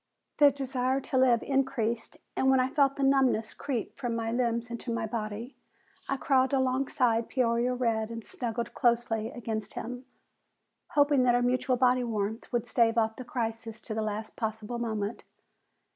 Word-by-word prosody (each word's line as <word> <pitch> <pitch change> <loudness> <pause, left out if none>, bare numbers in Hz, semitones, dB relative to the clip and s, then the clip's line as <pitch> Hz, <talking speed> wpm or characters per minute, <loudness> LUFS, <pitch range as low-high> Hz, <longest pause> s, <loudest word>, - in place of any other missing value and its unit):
The 290 -1 +8
desire 265 -1 -1
to 265 - -2
live 245 -3 +4
increased, 260 -5 -1 0.2
and 265 - +2
when 265 -1 +5
I 255 0 +2
felt 280 -2 +3
the 280 - -2
numbness 265 -5 +3
creep 260 -6 -4
from 245 -3 -2
my 225 0 -2
limbs 235 -1 -1
into 235 +1 -4
my 230 -1 -1
body, 220 +2 -5 0.5
I 275 - 0
crawled 265 0 +2
alongside 255 -3 +1
Peoria 245 -1 +1
Red 225 -3 0
and 230 -1 -7
snuggled 235 -1 -4
closely 235 -3 +1
against 220 -4 -5
him, 245 +2 -6 0.9
hoping 285 -2 +4
that 245 -1 +4
our 245 - +2
mutual 255 +1 +1
body 250 0 +3
warmth 220 0 -3
would 240 -2 0
stave 230 -1 +2
off 220 -1 +2
the 255 - -6
crisis 225 -4 -4
to 220 - -6
the 220 - -1
last 215 0 -4
possible 220 +1 -3
moment. 220 -2 -3
240 Hz, 165 wpm, -29 LUFS, 225-260 Hz, 0.9 s, The